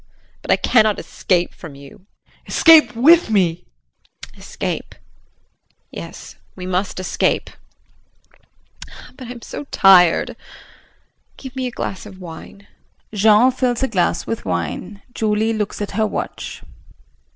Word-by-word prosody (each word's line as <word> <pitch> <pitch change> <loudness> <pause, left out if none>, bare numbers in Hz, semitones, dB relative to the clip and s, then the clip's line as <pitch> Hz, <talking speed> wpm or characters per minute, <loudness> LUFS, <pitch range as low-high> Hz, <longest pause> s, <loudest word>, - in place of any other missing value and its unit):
But - - -13
I - - +5
cannot 215 -4 +2
escape 175 -2 -1
from 160 -5 -11
you. 140 +7 -15 0.2
JEAN. - - -33
Escape 315 -7 +6
with 320 +7 +5
me. 190 -6 +2 0.8
JULIE. - - -24
Escape? - - -5 1.0
Yes, - - -10 0.2
we 180 - -8
must 185 +1 -2
escape. 185 - -1 1.6
But 255 - -10
I'm 240 -1 -9
so - - -7
tired. 185 -9 +4 1.0
Give 265 -1 -10
me 260 -1 -2
a 245 - -9
glass 195 +2 -5
of 190 -2 -13
wine. 180 +3 -11 0.5
[Jean 215 +4 +5
fills 250 -1 -1
a - - +2
glass 180 -8 0
with 230 - -4
wine, 90 - -4
Julie 220 0 0
looks 210 -2 -3
at 205 - -6
her 215 +2 0
watch. - - -6
210 Hz, 130 wpm, -19 LUFS, 185-245 Hz, 1.6 s, Escape